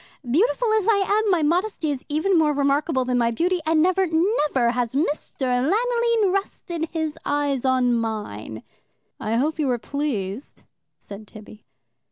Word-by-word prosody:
Beautiful 435 Hz, -, +2 dB
as 435 Hz, -2 st, +1 dB
I 400 Hz, -3 st, +3 dB, 0.2 s
am, 430 Hz, -, 0 dB
my 350 Hz, -5 st, +2 dB
modesty 340 Hz, 0 st, 0 dB
is 270 Hz, -3 st, -5 dB
even 315 Hz, +6 st, +1 dB
more 310 Hz, -3 st, +3 dB
remarkable 280 Hz, -1 st, +1 dB
than 250 Hz, -1 st, 0 dB
my 235 Hz, -1 st, +2 dB
beauty, 350 Hz, +10 st, 0 dB
and 320 Hz, -1 st, +3 dB
never, 370 Hz, +1 st, +2 dB
never 320 Hz, -, +1 dB
has 245 Hz, 0 st, -2 dB
Mr. 295 Hz, 0 st, -2 dB, 0.2 s
Lanoline 460 Hz, -, +1 dB
rested 345 Hz, -4 st, -3 dB
his 315 Hz, -2 st, -3 dB
eyes 285 Hz, -3 st, -1 dB
on 255 Hz, -2 st, +2 dB
mine.'" 210 Hz, -, -4 dB, 0.6 s
"I 220 Hz, +1 st, -2 dB
hope 305 Hz, +6 st, 0 dB
you 295 Hz, -, +1 dB
were 250 Hz, -2 st, +1 dB
pleased," 240 Hz, -4 st, -4 dB, 0.3 s
said 205 Hz, +1 st, -11 dB
Tibby. 215 Hz, 0 st, -14 dB
295 Hz, 155 wpm, -23 LUFS, 245-365 Hz, 0.6 s, I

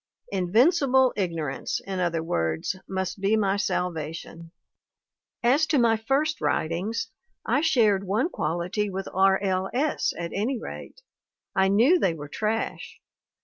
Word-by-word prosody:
Invincible 255 Hz, -, +3 dB
ignorance, 165 Hz, -8 st, -2 dB
in 190 Hz, -1 st, -4 dB
other 170 Hz, -2 st, 0 dB
words, 80 Hz, -, -1 dB
must 190 Hz, 0 st, -3 dB
be 205 Hz, +3 st, +3 dB
my 200 Hz, -2 st, +1 dB
salvation! 165 Hz, -3 st, -3 dB, 0.9 s
"As 280 Hz, +7 st, +3 dB
to 300 Hz, -, +2 dB
my 230 Hz, -3 st, +4 dB
'first 275 Hz, +8 st, 0 dB
writings/ 190 Hz, +10 st, -1 dB, 0.4 s
I 290 Hz, -, +2 dB
shared 220 Hz, -11 st, +3 dB
one 220 Hz, -, +1 dB
quality 180 Hz, -, -2 dB
with 190 Hz, 0 st, -5 dB
R, 190 Hz, +1 st, +4 dB
L. 190 Hz, -1 st, 0 dB
S. 295 Hz, +4 st, +1 dB
at 170 Hz, 0 st, -4 dB
any 235 Hz, +5 st, -1 dB
rate; -, -, -9 dB, 0.5 s
I 190 Hz, 0 st, +4 dB
knew 240 Hz, -, +4 dB
they 170 Hz, -, +1 dB
were 145 Hz, -2 st, -8 dB
trash. 220 Hz, +6 st, -3 dB
195 Hz, 135 wpm, -26 LUFS, 175-240 Hz, 0.9 s, my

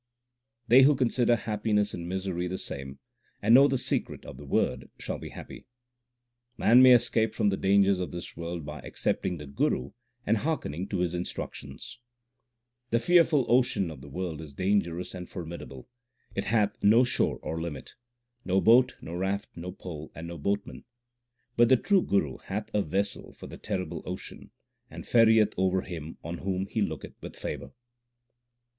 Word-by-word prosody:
They 125 Hz, +3 st, +8 dB
who 140 Hz, +2 st, +6 dB
consider 120 Hz, -2 st, +2 dB
happiness 105 Hz, -2 st, 0 dB
and 85 Hz, 0 st, -5 dB
misery 95 Hz, -1 st, -2 dB
the 95 Hz, +1 st, -3 dB
same, 70 Hz, -4 st, -7 dB, 0.4 s
and 110 Hz, +3 st, +3 dB
know 135 Hz, +3 st, +8 dB
the 135 Hz, -, +1 dB
secret -, -, -2 dB
of -, -, -9 dB
the 70 Hz, +1 st, -11 dB
Word 65 Hz, -1 st, 0 dB
shall -, -, -5 dB
be -, -, -8 dB
happy. -, -, -11 dB, 0.9 s
Man 120 Hz, +3 st, +6 dB
may 130 Hz, -1 st, +9 dB
escape 110 Hz, -2 st, +1 dB
from 105 Hz, -, +2 dB
the 95 Hz, -, 0 dB
dangers 100 Hz, 0 st, +3 dB
of 90 Hz, -, -3 dB
this 85 Hz, 0 st, -7 dB
world 85 Hz, -1 st, -5 dB
by 75 Hz, 0 st, -7 dB
accepting 90 Hz, +4 st, -2 dB
the 75 Hz, -, -8 dB
Guru 70 Hz, 0 st, -1 dB, 0.3 s
and 115 Hz, -, +2 dB
hearkening 100 Hz, -, -2 dB
to 95 Hz, -4 st, -2 dB
his 90 Hz, -1 st, 0 dB
instruc 90 Hz, 0 st, -4 dB
tions: -, -, -10 dB, 0.9 s
The 115 Hz, -, +2 dB
fearful 160 Hz, 0 st, +4 dB
ocean 120 Hz, -8 st, +2 dB
of 75 Hz, -, -10 dB
the 70 Hz, -, -11 dB
world 85 Hz, 0 st, -4 dB
is 75 Hz, -3 st, -10 dB
dangerous 90 Hz, -2 st, 0 dB
and 90 Hz, -1 st, -8 dB
formid 85 Hz, -2 st, -7 dB
able; 65 Hz, -2 st, -11 dB, 0.5 s
it -, -, -2 dB
hath 105 Hz, -3 st, +1 dB
no 110 Hz, +5 st, +6 dB
shore 125 Hz, -, +1 dB
or 80 Hz, +1 st, -3 dB
limit, 80 Hz, -5 st, -6 dB, 0.5 s
No 95 Hz, +1 st, +2 dB
boat, 125 Hz, +5 st, +5 dB
no 85 Hz, -, -8 dB
raft, 95 Hz, +3 st, -2 dB
no 90 Hz, +2 st, -6 dB
pole, 80 Hz, -4 st, -8 dB
and 80 Hz, +1 st, -7 dB
no 85 Hz, -1 st, -7 dB
boatman; 100 Hz, +6 st, -2 dB, 0.7 s
But 120 Hz, 0 st, +5 dB
the 130 Hz, -, +6 dB
true 195 Hz, -, +3 dB
Guru 75 Hz, -, 0 dB
hath 105 Hz, +2 st, -5 dB
a 105 Hz, -, +2 dB
vessel 100 Hz, +4 st, -2 dB
for -, -, -11 dB
the -, -, -9 dB
terrible -, -, -4 dB
ocean, -, -, -7 dB, 0.4 s
and -, -, -9 dB
ferrieth 110 Hz, -2 st, +5 dB
over 95 Hz, 0 st, +2 dB
him 80 Hz, -4 st, -7 dB
on 85 Hz, +1 st, -5 dB
whom 95 Hz, 0 st, -2 dB
he 105 Hz, +2 st, -3 dB
looketh 80 Hz, -8 st, -3 dB
with -, -, -9 dB
favour. -, -, -6 dB
95 Hz, 175 wpm, -28 LUFS, 85-115 Hz, 0.9 s, may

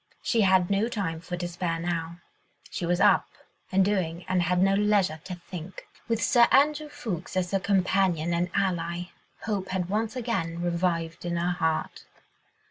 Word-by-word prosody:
She 230 Hz, -, +2 dB
had 190 Hz, -2 st, +4 dB
no 205 Hz, +4 st, +2 dB
time 165 Hz, -8 st, -3 dB
for 175 Hz, +1 st, -5 dB
despair 175 Hz, -1 st, -3 dB
now. 170 Hz, 0 st, -3 dB, 0.5 s
She 170 Hz, -, -3 dB
was 175 Hz, +1 st, +1 dB
up -, -, +4 dB, 0.4 s
and 190 Hz, 0 st, +4 dB
doing 180 Hz, -4 st, -1 dB
and 185 Hz, -1 st, +1 dB
had 180 Hz, +1 st, +1 dB
no 195 Hz, +1 st, +4 dB
leisure 200 Hz, -6 st, +2 dB
to 185 Hz, -, -5 dB
think. 175 Hz, 0 st, -9 dB, 0.2 s
With 230 Hz, -1 st, 0 dB
Sir 240 Hz, -4 st, +5 dB
Andrew 300 Hz, +2 st, +3 dB
Ffoulkes 185 Hz, -, -5 dB
as 180 Hz, -1 st, 0 dB
her 195 Hz, -, +2 dB
companion 185 Hz, -4 st, +1 dB
and 175 Hz, +1 st, 0 dB
ally, 175 Hz, -2 st, -1 dB, 0.3 s
hope 200 Hz, -4 st, -2 dB
had 185 Hz, -1 st, -2 dB
once 220 Hz, +3 st, -1 dB
again 190 Hz, -9 st, -2 dB
revived 170 Hz, -1 st, -1 dB
in 175 Hz, 0 st, -2 dB
her 175 Hz, +1 st, 0 dB
heart. 160 Hz, -3 st, -2 dB
180 Hz, 165 wpm, -27 LUFS, 170-200 Hz, 0.5 s, Sir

